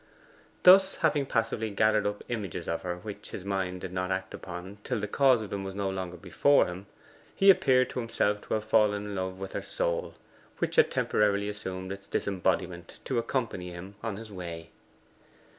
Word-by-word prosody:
Thus, 190 +1 +8
having 145 -2 +2
passively 115 -1 0
gathered 110 +1 +2
up 105 0 -4
images 100 -7 -4
of 85 - -1
her 90 -1 -3
which 100 +3 -8
his 95 - -7
mind 95 -2 -2
did 90 -1 -6
not 90 0 -1
act 95 0 -2
upon 90 +3 -8
till 125 -4 -2
the 105 - -2
cause 130 0 +4
of 105 - -9
them 100 -1 -3
was 95 0 -6
no 100 -1 -1
longer 90 -2 -5
before 100 +11 +3
him, 90 +3 -7 0.5
he 195 0 +8
appeared 130 -8 +3
to - - -3
himself 105 -3 0
to - - 0
have 110 0 -2
fallen 105 -2 +3
in 105 - -5
love 95 0 -3
with 95 0 -7
her - - -2
soul, 85 0 -2 0.4
which - - -2
had - - +6
temporarily 100 -1 +1
assumed 95 -2 -5
its 100 0 -8
disembodiment 90 -2 -1
to 130 -3 0
accompany 115 -8 -2
him 90 +3 -9
on 115 -3 -3
his 110 0 -9
way. 85 -3 -7
100 Hz, 190 wpm, -29 LUFS, 95-110 Hz, 0.5 s, Thus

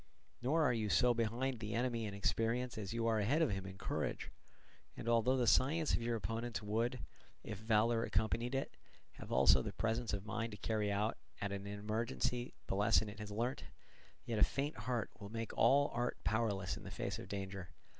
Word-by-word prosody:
Nor 155 +6 +2
are 135 - +4
you 110 -3 -1
so 125 +4 +5
behind 120 +2 -1
the 105 -1 -4
enemy 120 -1 0
in 100 - -5
experience 115 +4 0
as 100 -3 -4
you 115 0 -1
are 110 -1 +3
ahead 140 +11 +3
of 150 - +2
him 95 -1 -3
in 95 0 -9
courage; - - -3 0.7
and - - -6
although 120 +3 +3
the 125 - +2
science 140 +9 +3
of - - +2
your 115 0 0
opponents 115 +1 -3
would, 115 +4 0 0.4
if 105 - -6
valour 115 +1 +3
accompanied 115 +5 0
it, 135 - -2 0.4
have - - -8
also - - +6
the - - -4
presence 115 +1 -1
of 100 -1 -3
mind 115 0 -3
to - - -7
carry 105 -2 0
out 105 +2 0 0.2
at 100 0 -2
in 100 0 -4
emergency 115 +4 -2
the - - -2
lesson 105 +1 +3
it 105 +1 -10
has 105 0 -6
learnt, 115 +5 -2 0.6
yet 115 -2 -1
a - - +7
faint 145 +3 0
heart 120 -4 -2
will 100 -1 -7
make 115 +1 -4
all 145 +1 +5
art 120 +1 -1
powerless 105 -4 0
in 110 - -9
the 100 - -7
face 100 +2 -3
of 115 - -8
danger. 95 -3 -5
115 Hz, 200 wpm, -37 LUFS, 105-120 Hz, 0.7 s, a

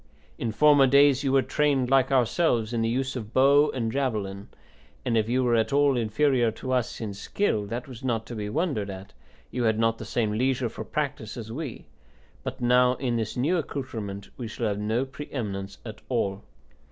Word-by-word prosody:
In 115 - -1
former 145 +3 +5
days 140 +1 +5
you 135 - +1
were 135 -1 +4
trained, 140 -4 +1
like 135 0 +4
ourselves, 120 -3 +2
in 115 - 0
the 115 - +1
use 130 +3 -1
of 110 -3 -6
bow 140 +3 +5
and 115 -3 -2
javelin, 105 -7 -2 0.6
and 120 -2 +1
if 110 0 +1
you 130 +2 +2
were 120 -1 +2
at 110 -1 +2
all 140 -1 +4
inferior 120 +2 +2
to 130 - -6
us 125 -2 0
in 110 -3 -4
skill, 105 - -1
that 120 +3 -5
was 125 -3 -10
not 115 -4 -1
to 120 - -7
be 105 -1 -4
wondered 140 - -1
at; 95 0 -9 0.4
you 125 -2 -1
had 110 -1 +2
not 115 0 +1
the - - -5
same 110 0 0
leisure 125 +2 0
for - - -7
practice 140 -7 -3
as 110 -2 -7
we; 140 -1 -6 0.6
but - - -6
now 125 +1 +4
in 125 -2 -1
this 115 0 -2
new 155 +9 +2
accoutrement 110 -10 -5
we 120 - -5
shall 110 +2 -4
have 105 -1 -1
no 110 +5 0
pre 135 +3 -9
eminence 100 -6 -4
at 110 -2 -8
all. 100 -5 -1
120 Hz, 200 wpm, -26 LUFS, 110-135 Hz, 0.6 s, former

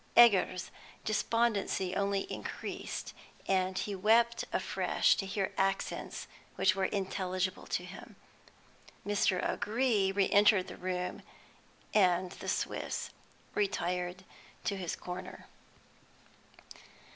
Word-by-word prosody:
Egger's 195 -6 +6 0.3
despondency 215 -4 +1
only 200 0 +1
increased, - - -5 0.3
and 185 -1 +1
he 205 - -2
wept 230 +4 +3
afresh - - +2
to 195 - -2
hear 195 -1 -2
accents 195 0 -1 0.3
which 190 - +3
were 195 -1 +1
intelligible 185 -1 -2
to - - -2
him. - - -11 0.9
Mr. 200 -3 +2
O'Gree 210 -2 +1
re 195 0 +2
entered 205 -2 +5
the - - -7
room, 180 0 -3 0.7
and 180 -3 +3
the - - -6
Swiss - - -2 0.4
retired 180 -2 -1 0.4
to 200 - 0
his 180 -4 -3
corner. 180 +1 -7
195 Hz, 100 wpm, -32 LUFS, 185-205 Hz, 0.9 s, Egger's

